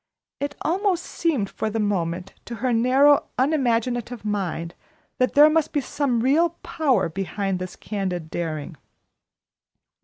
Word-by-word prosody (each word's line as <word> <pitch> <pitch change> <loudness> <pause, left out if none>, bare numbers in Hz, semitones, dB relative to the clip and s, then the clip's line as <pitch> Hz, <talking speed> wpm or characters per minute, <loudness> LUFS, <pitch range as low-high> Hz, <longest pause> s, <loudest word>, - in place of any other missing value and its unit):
It 285 0 -3
almost 370 +1 +1
seemed 295 - -1
for 220 - -3
the 225 +1 -2
moment 185 -3 -1
to 235 - -6
her 245 +1 0
narrow, 265 +5 +4
unimaginative 245 -4 0
mind 180 -5 -2 0.5
that 255 - +1
there 295 +1 +9
must 310 0 +1
be 295 - +2
some 270 -3 -1
real 325 +7 +2
power 295 - +1
behind 195 +2 -3
this 185 0 -6
candid 180 -6 -4
daring. 160 -2 -4
235 Hz, 130 wpm, -24 LUFS, 195-290 Hz, 0.5 s, there